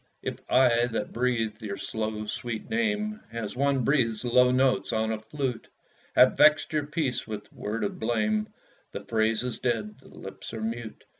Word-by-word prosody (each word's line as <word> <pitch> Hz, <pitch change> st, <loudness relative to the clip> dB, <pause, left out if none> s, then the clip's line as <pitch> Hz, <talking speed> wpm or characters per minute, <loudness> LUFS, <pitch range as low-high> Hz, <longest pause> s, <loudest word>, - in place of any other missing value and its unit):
If -, -, -4 dB
I 120 Hz, -2 st, +4 dB
that 115 Hz, -2 st, -3 dB
breathe 115 Hz, -3 st, 0 dB
your 100 Hz, -2 st, -4 dB
slow 110 Hz, -1 st, -3 dB
sweet 115 Hz, -, -5 dB
name, 215 Hz, -1 st, 0 dB
As 115 Hz, -2 st, -5 dB
one 140 Hz, 0 st, +2 dB
breathes 115 Hz, -4 st, +1 dB
low 125 Hz, +1 st, +5 dB
notes 130 Hz, +1 st, +2 dB
on 110 Hz, 0 st, 0 dB
a 110 Hz, -, -2 dB
flute, 125 Hz, +2 st, -4 dB, 0.5 s
Have -, -, +6 dB
vext 155 Hz, 0 st, +5 dB
your 150 Hz, -1 st, 0 dB
peace 145 Hz, -6 st, -1 dB
with 105 Hz, -2 st, -7 dB
word 105 Hz, +2 st, -3 dB
of 100 Hz, -, -3 dB
blame, 110 Hz, -2 st, 0 dB, 0.5 s
The -, -, -4 dB
phrase 110 Hz, 0 st, +1 dB
is 125 Hz, -1 st, -3 dB
dead 110 Hz, -4 st, -2 dB
the -, -, -18 dB
lips -, -, -9 dB
are 110 Hz, -, -5 dB
mute. 115 Hz, 0 st, -5 dB
115 Hz, 170 wpm, -27 LUFS, 110-130 Hz, 0.5 s, Have